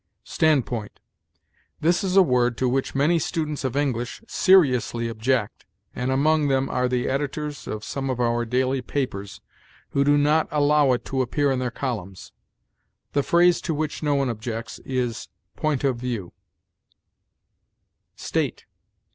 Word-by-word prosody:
STANDPOINT. 125 -9 0 0.8
This 170 +5 +2
is 190 -1 -1
a 195 - +8
word 125 -5 +1
to 130 - +1
which 130 +2 -1
many 155 +5 +3
students 150 -2 -3
of 130 -1 -2
English 130 - -2
seriously 130 - +3
object, 115 0 -1 0.3
and 125 +1 -2
among 150 +3 +2
them 135 -1 +1
are 125 0 0
the 125 -1 0
editors 145 +2 -3
of 105 -1 -5
some 135 +5 -4
of 130 -2 -2
our 120 -1 +1
daily 130 +3 0
papers, 105 -7 -4 0.5
who 140 - +1
do 145 +1 +4
not 150 +2 +3
allow 145 -1 +3
it 120 - -3
to 135 -1 -1
appear 140 +3 +1
in 130 - 0
their 125 -1 -1
columns. 110 -8 -5 0.8
The 145 - +3
phrase 175 +4 +3
to 160 - -2
which 155 0 -3
no 145 -2 +1
one 140 -1 +1
objects 115 0 -5
is, 120 -3 -3 0.3
point 150 -3 -1
of 135 -3 +1
view. 120 -7 -4 1.8
STATE. - - -2
130 Hz, 145 wpm, -24 LUFS, 120-145 Hz, 1.8 s, a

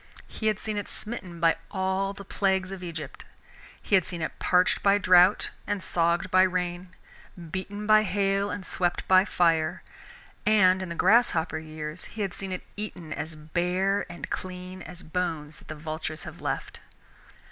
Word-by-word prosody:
He 220 - -3
had 215 -2 +2
seen 215 0 -4
it 205 - -4
smitten 190 -6 -5
by 165 -1 +4
all 190 +1 0
the 200 0 -10
plagues 190 -1 0
of 195 -1 -6
Egypt. 160 -5 -7 0.6
He - - -7
had 190 -2 +6
seen 170 -3 -3
it - - -5
parched 180 0 +3
by 200 0 +5
drought, 185 0 +5 0.2
and 205 -2 -2
sogged 170 +1 +1
by 185 - +6
rain, 180 -1 -1 0.6
beaten 205 +3 -4
by 215 0 +6
hail, 195 0 +1
and 205 -2 -5
swept 175 -1 -1
by 185 0 +6
fire, 165 -3 +1 0.6
and 190 -4 +5
in 185 - -4
the 170 - -4
grasshopper 180 -6 +3
years 155 +1 -7
he 215 - -5
had 195 -2 -3
seen 195 -1 -5
it 185 - -4
eaten 180 -7 -6
as 155 +2 -5
bare 180 +5 0
and 170 - -8
clean 185 0 -6
as 180 +2 -10
bones 160 -3 -3
that - - -18
the 155 - -6
vultures 155 +1 -5
have - - -9
left. - - -3
185 Hz, 170 wpm, -27 LUFS, 170-195 Hz, 0.6 s, had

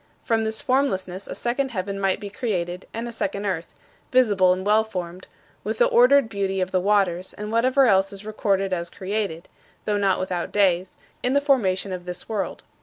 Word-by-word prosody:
From 225 -2 +1
this 220 0 -1
formlessness 195 -9 0
a - - -5
second 260 +3 -1
heaven 200 -3 -4
might 195 -1 +1
be 205 -1 -7
created 180 -6 -3
and 230 +1 -4
a - - -5
second 200 -2 -3
earth 175 -4 -3 0.4
visible 205 -8 +4
and 185 +1 -1
well 215 +1 +4
formed, 185 -4 -6 0.4
with 220 +2 -3
the - - +5
ordered 255 +1 +5
beauty 195 -2 -2
of 185 0 -1
the 185 - +2
waters, 190 -3 +1
and 210 +1 -6
whatever 255 +4 +4
else 195 -4 +3
is 200 +1 -9
recorded 195 -3 0
as 170 -1 -2
created 195 -3 -3 0.4
(though 210 -1 +1
not 195 -2 +2
without 180 -2 -3
days) 185 -3 +2 0.3
in 250 - 0
the 280 - +5
formation 200 -10 +1
of 180 -1 -6
this 180 0 -7
world. 215 -3 -3
200 Hz, 190 wpm, -24 LUFS, 185-225 Hz, 0.4 s, the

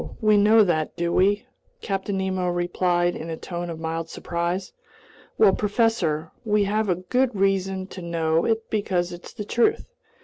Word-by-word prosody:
We 215 -1 +4
know 215 +2 +6
that, 155 -5 0
do 170 0 -1
we?" 205 +5 +2 0.4
Captain 195 -1 -2
Nemo 190 -1 -1
replied 175 0 0
in 165 - -6
a 160 - -4
tone 175 0 -5
of 165 -1 -6
mild 165 0 -3
surprise. 170 - -3 0.6
"Well, 200 -3 +6
professor, 205 -8 0
we 210 -2 +2
have 200 -3 -1
good 255 -2 +2
reason 195 -1 0
to 185 - -8
know 165 -1 0
it 225 0 0
because 180 -4 0
it's 175 - -10
the 210 - -7
truth. 240 - +1
190 Hz, 160 wpm, -24 LUFS, 170-210 Hz, 0.6 s, know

